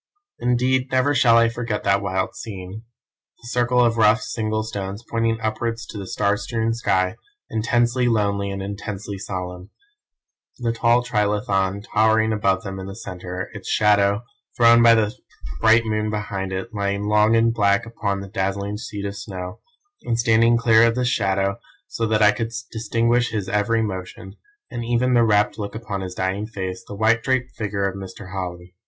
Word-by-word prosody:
"Indeed 125 +2 +1
never 130 +2 +2
shall 120 -4 +5
I 115 0 +5
forget 115 -2 -3
that 100 0 +2
wild 95 -1 -2
scene. 100 0 -8 0.6
The - - -10
circle 125 0 +2
of 115 0 +1
rough, 110 +1 +5
single 110 -1 -2
stones 100 -1 -5
pointing 115 -1 0
upwards 115 +1 -2
to - - -9
the 95 - -7
star 100 +1 +1
strewn 115 +1 -1
sky, 95 -5 0 0.3
intensely 120 +2 +1
lonely 100 -3 +1
and 100 0 -4
intensely 100 0 -6
solemn: 90 -1 -6 0.9
the 120 -2 -1
tall 115 +1 +2
trilithon 100 -4 0
towering 110 +1 +3
above 100 -1 +1
them 95 -2 -6
in 95 - -7
the 95 - -7
centre, 90 -3 -6
its 100 -3 -8
shadow, 100 0 +3 0.3
thrown 115 0 +6
by 115 -1 +7
the 110 +1 +1 0.4
bright 115 +3 +5
moon 110 -1 -1
behind 105 -3 -3
it, 95 +5 -5
lying 100 -1 -1
long 105 +1 +4
and 115 0 +3
black 100 -2 +2
upon 105 -4 -3
the 100 - -7
dazzling 100 0 -2
sheet 105 -2 -6
of 100 0 -4
snow, 90 -3 -7 0.4
and, 115 - -1
standing 115 0 +4
clear 115 -1 +5
of 115 0 +3
this 125 -1 +1
shadow 100 -3 0 0.3
so 115 - -2
that 110 0 +2
I 105 - +7
could 115 +1 -3 0.2
distinguish 115 +2 +1
his 105 -4 -3
every 105 +3 +1
motion, 95 -1 -6 0.4
and 120 - -4
even 120 +2 +1
the 120 -1 +5
rapt 105 -1 +2
look 100 +1 -5
upon 110 -3 -4
his 90 -1 -6
dying 95 +3 -2
face, 95 -4 -5
the 100 - -7
white 110 +3 +3
draped 130 0 -1
figure 100 -3 -1
of 95 - -4
Mr. 95 0 -9
Holly. 90 -2 -6
105 Hz, 175 wpm, -22 LUFS, 100-115 Hz, 0.9 s, by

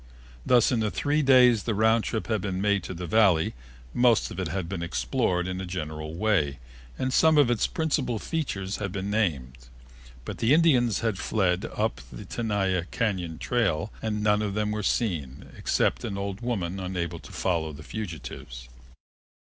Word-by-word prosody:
Thus, 120 - +4
in 110 -4 +1
three 145 +7 0
days 125 -5 +6
the 115 - 0
round 110 +1 +3
trip 110 - -2
had 110 -4 -1
been 95 -1 -3
made 100 0 +2
to 90 - -6
the 90 +1 -5
Valley, 90 -3 +3 0.4
most 120 -2 +3
of - - -6
it 95 - -1
had 90 +2 -3
been 90 -1 -4
explored 90 0 0
in 95 0 -3
a - - -4
general 80 -3 -5
way 85 -8 +1 0.4
and 130 0 -1
some 160 +2 +5
of 140 -5 +5
its 120 - +1
principal 150 -8 -1
features 100 -9 -3
had 100 -3 -3
been 100 +1 -3
named. 65 - -1 0.6
But - - -6
the 120 +5 +4
Indians 130 - +3
had 110 -4 -1
fled 95 -4 0
up - - -1
the - - -9
Tenaya 95 -6 -1
Cañon 90 -8 -1
trail 105 -7 0
and 105 -1 -2
none 105 0 +3
of 100 -2 -2
them 105 0 0
were 105 0 -2
seen, 85 - -1
except - - 0
an 100 - -3
old 100 +1 -4
woman 95 -7 -2
unable 90 -3 -3
to 70 - -13
follow 85 -4 -1
the 75 +1 -10
fugitives. 75 - -7
100 Hz, 175 wpm, -27 LUFS, 90-115 Hz, 0.6 s, days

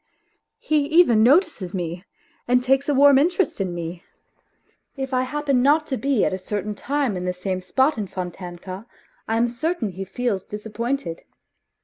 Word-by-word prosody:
He 300 -2 +1
even 310 -9 +5
notices 245 - +3
me 175 +1 -4 0.4
and 250 0 +3
takes 270 +2 +2
a - - +3
warm 280 0 +7
interest 345 - +1
in 185 -2 -1
me. 170 +1 -6 0.9
If 265 0 -4
I 255 - +2
happen 280 -1 0
not 300 +4 +4
to 275 - -2
be 270 -5 +1
at - - 0
a 185 - -3
certain 205 +2 -3
time 275 0 -1
in 180 0 -4
the 180 - -1
same 185 0 -3
spot 265 +7 +1
in 205 - -3
Fontanka, 185 +2 -7 0.4
I 225 - 0
am 235 +1 +3
certain 245 - -2
he 190 +2 -6
feels 200 0 -2
disappointed. 215 -3 -4
235 Hz, 165 wpm, -23 LUFS, 185-275 Hz, 0.9 s, warm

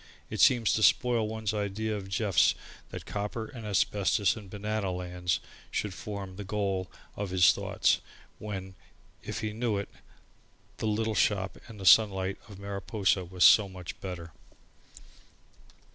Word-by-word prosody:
It - - -1
seemed 120 -3 +5
to 110 - +2
spoil 120 -1 +3
one's 110 -1 -3
idea 105 +1 -2
of 95 -2 -6
Jeff 100 0 +3 0.3
that - - -8
copper 105 +2 -4
and 110 -1 -9
asbestos 100 0 +2
and 105 -4 -10
banana 105 0 -2
lands 90 -1 -2 0.3
should 105 -3 -2
form 100 -3 -7
the 105 - -5
goal 95 -2 -2 0.3
of 100 -1 -4
his 90 -1 +5
thought - - +1 0.4
when, 95 -3 -6 0.5
if - - -5
he 110 -1 -3
knew 115 -2 -1
it, 100 - -4 0.9
the - - -2
little 110 +1 0
shop 100 -2 +1
and 110 -3 -11
the 95 - -6
sunlight 95 -2 +5
of 100 - -10
Mariposa 100 0 -1
was 90 0 -1
so 105 -3 +7
much 90 -2 -9
better. 90 -3 -6
100 Hz, 145 wpm, -29 LUFS, 95-110 Hz, 0.9 s, so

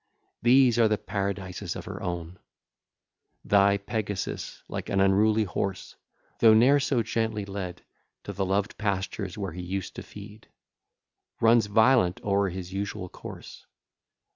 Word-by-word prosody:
These 120 -1 +5
are 115 - +6
the 105 0 +1
paradises 100 -3 -4
of - - -7
her - - -7
own: 85 0 -5 1.1
Thy 100 0 +4
Pegasus, 105 -1 -4
like - - -5
an 100 - +1
unruly 105 +3 +4
horse, 95 0 -4 0.4
Though 110 -1 +7
ne'er 130 +6 +5
so 130 -4 +1
gently 110 -2 -2
led, 95 -3 -6 0.4
To - - -6
the 100 - -2
loved 100 +2 -1
pastures 100 -1 -2
where 100 -3 -3
he 90 - -6
used 95 +1 -4
to - - -4
feed, 105 +1 -12 0.9
Runs 115 -1 +4
violent 110 -3 +3
o'er 100 -1 +1
his 90 0 -7
usual 95 -2 -4
course. - - -11
100 Hz, 140 wpm, -27 LUFS, 95-110 Hz, 1.1 s, Though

